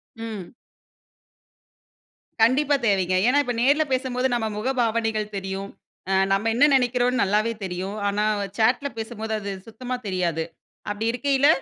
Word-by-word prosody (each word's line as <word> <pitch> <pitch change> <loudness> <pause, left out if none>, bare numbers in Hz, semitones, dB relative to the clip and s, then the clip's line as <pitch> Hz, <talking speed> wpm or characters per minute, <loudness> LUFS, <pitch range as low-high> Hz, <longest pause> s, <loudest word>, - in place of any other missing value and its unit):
ம். 220 -5 -7 1.9
கண்டிப்பா 280 +5 +4
தேவைங்க. 185 -3 +2
ஏன்னா 255 +3 +4
இப்ப 245 - -2
நேர்ல 285 +5 +4
பேசும்போது 255 0 0
நம்ம 230 -2 0
முகபாவனைகள் 225 -3 0
தெரியும். 195 +1 -4 0.4
அ - - +1 0.2
நம்ம 200 +3 +2
என்ன 275 +5 +6
நெனைக்கிறோம்னு 250 0 +2
நல்லாவே 210 +4 +1
தெரியும். 190 +2 -4
ஆனா 205 +1 0 0.2
வ - - -1
சேட்ல 245 +5 +2
பேசும்போது 220 -1 -4
அது 200 -1 -5 0.2
சுத்தமா 250 +3 -5
தெரியாது. 175 -4 0 0.5
அப்படி 205 +2 -3
இருக்கையில 270 +3 +2
225 Hz, 130 wpm, -24 LUFS, 200-250 Hz, 1.9 s, என்ன